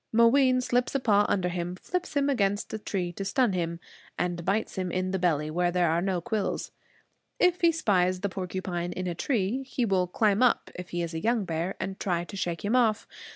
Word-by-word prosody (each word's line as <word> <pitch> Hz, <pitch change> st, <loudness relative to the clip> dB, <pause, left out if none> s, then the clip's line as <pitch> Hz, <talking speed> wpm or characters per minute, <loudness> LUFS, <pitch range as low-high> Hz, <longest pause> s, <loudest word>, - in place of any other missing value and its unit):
Mooween 255 Hz, +3 st, +5 dB
slips 250 Hz, +1 st, 0 dB
a -, -, +3 dB
paw 205 Hz, -4 st, +3 dB
under 185 Hz, -3 st, +1 dB
him, 175 Hz, 0 st, -3 dB
flips 360 Hz, -, -4 dB
him 280 Hz, 0 st, +2 dB
against 205 Hz, -6 st, 0 dB
a 220 Hz, -, -3 dB
tree 185 Hz, -4 st, -3 dB
to 195 Hz, -, -5 dB
stun 210 Hz, +2 st, +1 dB
him, 170 Hz, -2 st, -2 dB, 0.4 s
and 175 Hz, -1 st, -2 dB
bites 195 Hz, +5 st, 0 dB
him 185 Hz, -2 st, -3 dB
in 185 Hz, +1 st, -1 dB
the 190 Hz, -, -1 dB
belly, 155 Hz, -4 st, +1 dB
where 175 Hz, +2 st, +1 dB
there 175 Hz, -2 st, +2 dB
are 165 Hz, +1 st, +1 dB
no 190 Hz, -1 st, 0 dB
quills. 210 Hz, 0 st, -2 dB, 0.7 s
If 360 Hz, 0 st, +3 dB
he 340 Hz, -1 st, +5 dB
spies 185 Hz, -, +1 dB
the 200 Hz, -, 0 dB
porcupine 180 Hz, -2 st, -4 dB
in 185 Hz, -, -4 dB
a 175 Hz, -, -1 dB
tree, 225 Hz, -, -1 dB
he 260 Hz, -2 st, -2 dB
will 190 Hz, -4 st, +1 dB
climb 210 Hz, +3 st, +2 dB
up, 250 Hz, -2 st, +2 dB
if 180 Hz, 0 st, -8 dB
he 175 Hz, 0 st, -2 dB
is 165 Hz, 0 st, -4 dB
a 160 Hz, -, -2 dB
young 225 Hz, -1 st, +1 dB
bear, 170 Hz, +3 st, -2 dB
and 195 Hz, 0 st, -4 dB
try 175 Hz, -3 st, 0 dB
to 175 Hz, -, -9 dB
shake 175 Hz, -2 st, -3 dB
him 215 Hz, +5 st, +1 dB
off. 225 Hz, -4 st, +2 dB
190 Hz, 220 wpm, -28 LUFS, 175-230 Hz, 0.7 s, Mooween